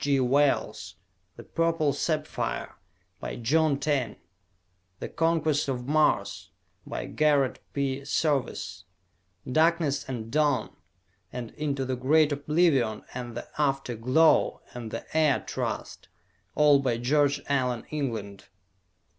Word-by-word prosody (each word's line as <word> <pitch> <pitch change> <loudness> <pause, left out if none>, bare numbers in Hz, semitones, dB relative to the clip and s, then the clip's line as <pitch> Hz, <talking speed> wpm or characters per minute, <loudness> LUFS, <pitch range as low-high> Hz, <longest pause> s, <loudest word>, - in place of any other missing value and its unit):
G. 140 -1 +2
Wells; 135 +3 +1 0.4
"The - - -10
Purple 165 -3 0
Sapphire," 155 +1 -2 0.5
by - - -5
John 145 +5 +2
Taine; 140 -7 -1 0.8
"The - - -4
Conquest 160 -3 +1
of 125 -2 -3
Mars," 155 +1 +1 0.4
by - - -4
Garrett 145 -4 +2
P. 140 -1 -1
Serviss; 145 -1 -1 0.6
"Darkness 155 0 +2
and 115 -3 -5
Dawn," 145 -6 +1 0.6
and 120 -2 -6
"Into 140 -3 -2
the 130 0 -1
Great 150 +4 +3
Oblivion," 145 -6 +1
and 120 -2 -6
"The - - -6
After 135 -3 0
Glow," 130 +8 +3
and 120 -2 -6
"The 115 - -6
Air 155 -4 +3
Trust" - - -4 0.5
all 150 -2 +6
by 125 -4 0
George 145 +3 +2
Allan 125 -4 0
England. 110 -10 -4
140 Hz, 115 wpm, -27 LUFS, 125-150 Hz, 0.8 s, all